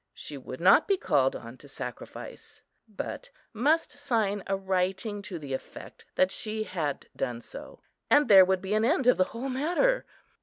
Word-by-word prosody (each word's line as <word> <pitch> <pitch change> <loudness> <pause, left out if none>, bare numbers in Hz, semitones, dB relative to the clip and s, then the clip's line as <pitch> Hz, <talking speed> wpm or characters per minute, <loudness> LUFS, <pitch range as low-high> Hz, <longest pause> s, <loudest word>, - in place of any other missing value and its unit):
She 150 - -7
would 130 -1 -8
not 190 - +6
be 395 -2 +3
called 135 - +2
on 115 +2 -9
to 145 - -14
sacrifice, 140 - -9 0.2
but 225 - -6 0.2
must 295 +9 +2
sign 225 -8 -1
a 195 0 0
writing 190 +2 -1
to 190 -2 -6
the 140 -4 -6
effect 130 - -8
that 185 0 +3
she 215 0 -4
had 160 -9 -3
done 120 -1 -3
so, - - -11 0.3
and 295 0 +5
there 195 -2 +9
would 185 0 0
be 190 +2 -2
an 215 +1 +2
end 270 +2 +2
of 250 - +5
the 185 - +4
whole 245 +7 -5
matter. 350 - +1
200 Hz, 180 wpm, -28 LUFS, 180-255 Hz, 0.3 s, there